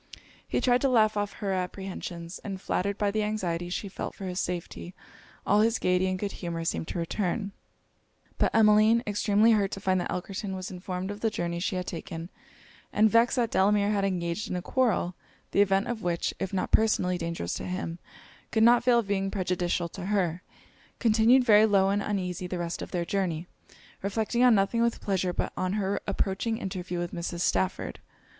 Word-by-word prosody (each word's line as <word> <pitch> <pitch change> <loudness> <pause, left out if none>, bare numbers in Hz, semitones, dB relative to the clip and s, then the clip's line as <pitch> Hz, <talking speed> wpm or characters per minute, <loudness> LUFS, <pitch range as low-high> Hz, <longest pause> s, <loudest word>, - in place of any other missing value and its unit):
He - - 0
tried 245 -1 +3
to 275 - +3
laugh 220 -4 +4
off 205 -1 -1
her 200 -2 -3
apprehensions; 180 -2 -5
and 195 -2 -6
flattered 200 +2 -1
by 205 -1 +1
the 215 +1 0
anxiety 180 -5 -2
she 195 +3 -3
felt 195 - -6
for 195 - -7
his 180 0 -3
safety, 180 0 -4 0.5
all 205 +2 +4
his 225 +1 +3
gaiety 180 +1 +2
and 185 0 -1
good 200 +1 -3
humour 170 -2 -5
seemed 165 - -2
to - - -4
return. 195 +4 -2 0.9
But - - +3
Emmeline, 220 +1 +5
extremely 210 +2 +3
hurt 205 -3 +3
to - - -4
find 185 -1 +1
that - - -4
Elkerton 190 +2 -4
was 185 0 -6
informed 185 +1 -4
of 205 - -7
the 225 - +1
journey 170 -4 -3
she 190 +1 -1
had 180 0 -2
taken, 165 0 -6 0.6
and 215 0 +4
vexed 230 +1 +4
that 235 -3 0
Delamere 205 +1 +3
had 200 -2 +1
engaged 180 0 -2
in - - -2
a 180 - -2
quarrel, 230 -8 +1 0.4
the 200 - +4
event 195 0 +2
of 235 -2 -3
which, 170 -1 -1
if 190 - -3
not 190 - -2
personally 180 -5 +2
dangerous 165 - -3
to - - -4
him, 180 -2 -4 0.5
could 220 -1 +2
not 240 +1 +6
fail 245 -1 +4
of 230 -4 0
being 195 -1 0
prejudicial 180 -3 -1
to 185 +2 -7
her, 180 -4 0 0.6
continued 230 +3 +4
very 215 -2 +6
low 195 -2 +3
and 200 +1 +1
uneasy 185 -3 -2
the 180 - -4
rest 170 -1 -3
of - - -6
their 175 -1 -2
journey, 175 -3 -1 0.6
reflecting 220 +4 -1
on 245 -3 +7
nothing 200 +4 +2
with 235 0 +1
pleasure 190 -2 0
but - - -3
on 185 0 -1
her 200 -1 -1
approaching 200 +3 -1
interview 185 -4 -4
with 175 0 -3
Mrs. 170 0 -4
Stafford. 185 +1 0
195 Hz, 195 wpm, -28 LUFS, 180-215 Hz, 0.9 s, on